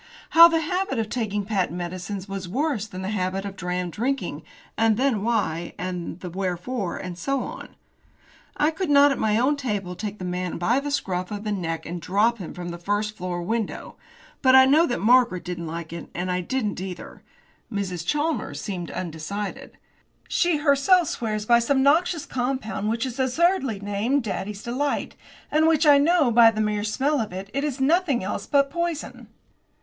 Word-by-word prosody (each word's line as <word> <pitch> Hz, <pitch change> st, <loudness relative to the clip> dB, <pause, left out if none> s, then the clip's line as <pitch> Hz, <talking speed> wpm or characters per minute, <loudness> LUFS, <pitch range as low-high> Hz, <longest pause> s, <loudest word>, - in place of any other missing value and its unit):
How 335 Hz, +1 st, +10 dB
the 330 Hz, -1 st, +1 dB
habit 365 Hz, -1 st, -1 dB
of 220 Hz, -1 st, -1 dB
taking 210 Hz, -4 st, -2 dB
patent 190 Hz, -4 st, -1 dB
medicines 185 Hz, +3 st, -5 dB
was 195 Hz, -2 st, -5 dB
worse 260 Hz, -, -1 dB
than 185 Hz, -2 st, -7 dB
the 190 Hz, -, -3 dB
habit 190 Hz, -1 st, -2 dB
of 195 Hz, -1 st, -6 dB
dram 180 Hz, -1 st, -3 dB
drinking, 265 Hz, +9 st, -2 dB, 0.3 s
and 225 Hz, -1 st, +3 dB
the 270 Hz, +2 st, +3 dB
why, 205 Hz, -7 st, -1 dB
and 180 Hz, -1 st, -5 dB
the 180 Hz, -, -5 dB
wherefore, 190 Hz, +3 st, -3 dB
and 180 Hz, -1 st, -6 dB
so 275 Hz, +7 st, -1 dB
on. -, -, -9 dB, 0.8 s
I 300 Hz, +2 st, +3 dB
could 345 Hz, +1 st, -3 dB
not, 285 Hz, 0 st, +6 dB
at 275 Hz, -, -2 dB
my 215 Hz, -1 st, +2 dB
own 270 Hz, +5 st, +2 dB
table, 205 Hz, -9 st, -3 dB
take 210 Hz, +1 st, -5 dB
the 185 Hz, -, -6 dB
man 180 Hz, 0 st, -3 dB
by 225 Hz, +10 st, +2 dB
the 290 Hz, +1 st, -4 dB
scruff 185 Hz, -10 st, -2 dB
of 205 Hz, 0 st, -5 dB
the 210 Hz, -, -2 dB
neck 165 Hz, -5 st, -3 dB
and 170 Hz, +1 st, -5 dB
drop 210 Hz, +7 st, +1 dB
him 180 Hz, -, -7 dB
from 175 Hz, -1 st, -6 dB
the 170 Hz, 0 st, -7 dB
first 205 Hz, +4 st, -1 dB
floor 180 Hz, -3 st, -4 dB
window. 220 Hz, +2 st, -3 dB, 0.5 s
But 260 Hz, 0 st, +6 dB
I 260 Hz, 0 st, +9 dB
know 305 Hz, +6 st, +5 dB
that 240 Hz, -, -2 dB
Margaret 235 Hz, -4 st, +4 dB
didn't 170 Hz, -2 st, -5 dB
like 165 Hz, 0 st, -6 dB
it 170 Hz, -, -7 dB
and 180 Hz, +1 st, -2 dB
I 180 Hz, 0 st, 0 dB
didn't 210 Hz, -1 st, -2 dB
either. 185 Hz, -2 st, -8 dB, 0.5 s
Mrs. 185 Hz, -5 st, -3 dB
Chalmers 300 Hz, -, -1 dB
seemed 180 Hz, -5 st, -5 dB
undecided. 185 Hz, +4 st, -5 dB, 0.5 s
She 345 Hz, -3 st, +2 dB
herself 295 Hz, +4 st, +3 dB
swears 215 Hz, -2 st, -3 dB
by 235 Hz, +1 st, +5 dB
some 265 Hz, +3 st, +2 dB
noxious 325 Hz, +3 st, +3 dB
compound, 245 Hz, -5 st, -2 dB
which 230 Hz, +3 st, -1 dB
is 255 Hz, 0 st, -6 dB
absurdly 265 Hz, -, +1 dB
named 205 Hz, +7 st, 0 dB
"Daddy's 205 Hz, -1 st, -4 dB
Delight," 270 Hz, +4 st, -2 dB, 0.4 s
and 310 Hz, +1 st, +4 dB
which 320 Hz, 0 st, +3 dB
I 290 Hz, -1 st, +7 dB
know, 305 Hz, -3 st, +3 dB
by 230 Hz, 0 st, +7 dB
the 220 Hz, -1 st, -4 dB
mere 210 Hz, -1 st, 0 dB
smell 270 Hz, +7 st, 0 dB
of 215 Hz, -, -4 dB
it, 190 Hz, +2 st, -7 dB
is 275 Hz, 0 st, -2 dB
nothing 290 Hz, -, +2 dB
else 200 Hz, +1 st, -4 dB
but 280 Hz, -1 st, +2 dB
poison. 340 Hz, -1 st, -3 dB
215 Hz, 185 wpm, -24 LUFS, 185-275 Hz, 0.8 s, How